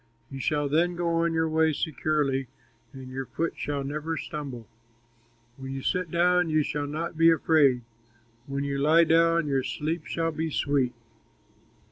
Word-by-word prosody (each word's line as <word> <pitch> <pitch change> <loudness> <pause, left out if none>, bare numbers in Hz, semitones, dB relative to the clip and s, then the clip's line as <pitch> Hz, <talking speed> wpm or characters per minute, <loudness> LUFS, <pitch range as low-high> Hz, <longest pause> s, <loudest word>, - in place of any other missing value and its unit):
You 135 - -6
shall 145 +2 0
then 170 +5 +1
go 170 0 -1
on 170 -1 0
your 160 0 +2
way 160 0 +2
securely, 145 -3 -1 0.4
And 130 -1 -10
your 135 0 -5
foot 165 +1 -2
shall 145 -1 -3
never 155 +3 -3
stumble. 140 -9 -6 0.9
When 135 0 -6
you 135 -1 -5
sit 180 -3 -1
down, 180 +1 +2
you 155 -1 +2
shall 145 0 -3
not 160 +2 -4
be 165 0 +7
afraid, 145 -6 +3 0.6
When 140 0 -3
you 140 -1 -2
lie 155 +4 +5
down, 165 0 +3
your 135 -2 +1
sleep 155 +4 -3
shall 165 0 -1
be 160 +1 -3
sweet. 140 -4 0
155 Hz, 160 wpm, -27 LUFS, 140-165 Hz, 0.9 s, be